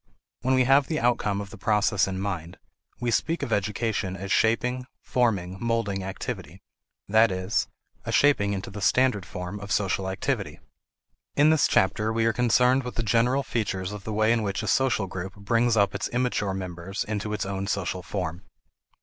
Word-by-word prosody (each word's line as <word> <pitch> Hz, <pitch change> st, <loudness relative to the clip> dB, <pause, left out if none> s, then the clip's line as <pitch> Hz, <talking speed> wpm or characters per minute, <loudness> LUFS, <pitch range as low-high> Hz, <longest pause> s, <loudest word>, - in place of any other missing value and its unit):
When 130 Hz, +1 st, +2 dB
we 130 Hz, -, +4 dB
have 135 Hz, +2 st, +4 dB
the 155 Hz, -, -1 dB
outcome 110 Hz, -4 st, +1 dB
of 100 Hz, -1 st, -8 dB
the 110 Hz, -, -11 dB
process 105 Hz, -2 st, +2 dB
in 95 Hz, -1 st, -3 dB
mind, 95 Hz, -3 st, -4 dB, 0.4 s
we 120 Hz, -1 st, -1 dB
speak 165 Hz, +8 st, 0 dB
of 115 Hz, -, -1 dB
education 100 Hz, -1 st, -1 dB
as 95 Hz, +1 st, -6 dB
shaping, 125 Hz, +3 st, +1 dB
forming, 100 Hz, -7 st, 0 dB
molding 115 Hz, -5 st, -1 dB
activity 95 Hz, -2 st, -6 dB, 0.4 s
that 110 Hz, +2 st, +5 dB
is, 95 Hz, +3 st, -1 dB, 0.4 s
a -, -, -4 dB
shaping 135 Hz, -9 st, +3 dB
into 95 Hz, 0 st, -5 dB
the 100 Hz, +1 st, -7 dB
standard 105 Hz, -2 st, +2 dB
form 90 Hz, +4 st, -6 dB
of 100 Hz, 0 st, -8 dB
social 95 Hz, -1 st, 0 dB
activity. 95 Hz, -, -2 dB, 0.8 s
In 150 Hz, +2 st, +5 dB
this 160 Hz, -2 st, +4 dB
chapter 105 Hz, +3 st, +2 dB
we 115 Hz, 0 st, +1 dB
are 115 Hz, -, +3 dB
concerned 125 Hz, +3 st, +3 dB
with 125 Hz, -4 st, -7 dB
the 115 Hz, -, -1 dB
general 120 Hz, +5 st, +2 dB
features 100 Hz, -6 st, -2 dB
of 105 Hz, -2 st, -7 dB
the 110 Hz, -, -5 dB
way 110 Hz, +1 st, +2 dB
in 115 Hz, -, +1 dB
which 100 Hz, -1 st, -2 dB
a -, -, -4 dB
social 130 Hz, -6 st, +2 dB
group 95 Hz, 0 st, -6 dB
brings 115 Hz, +3 st, +1 dB
up 100 Hz, -1 st, +3 dB
its 100 Hz, -, -2 dB
immature 120 Hz, -6 st, 0 dB
members 95 Hz, +1 st, -4 dB
into 105 Hz, 0 st, -3 dB
its 105 Hz, -, -2 dB
own 95 Hz, 0 st, -3 dB
social 95 Hz, -2 st, -2 dB
form. 90 Hz, -2 st, -4 dB
105 Hz, 185 wpm, -26 LUFS, 95-120 Hz, 0.8 s, that